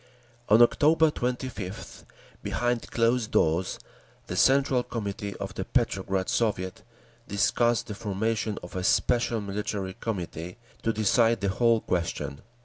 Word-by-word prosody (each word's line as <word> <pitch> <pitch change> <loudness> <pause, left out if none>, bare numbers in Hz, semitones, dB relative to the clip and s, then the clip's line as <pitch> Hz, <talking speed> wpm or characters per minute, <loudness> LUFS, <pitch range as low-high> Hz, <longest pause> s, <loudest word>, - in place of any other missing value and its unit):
On 110 +3 +8
October 155 +5 +4
25th, 125 -7 -5 0.4
behind 120 -1 -1
closed 115 -1 +1
doors, 85 +3 +1 0.5
the - - -5
Central 135 -1 +4
Committee 100 -4 -5
of - - -5
the - - -3
Petrograd 95 0 0
Soviet 95 -5 -1 0.5
discussed 115 +3 +2
the 105 - -6
formation 105 +1 -2
of 90 - -10
a 90 - -2
special 120 +3 +2
Military 100 -1 -3
Committee 90 -5 -5 0.2
to 115 - +1
decide 115 +1 +2
the 100 - +1
whole 115 +3 +3
question. 85 -5 -3
110 Hz, 125 wpm, -27 LUFS, 95-120 Hz, 0.5 s, On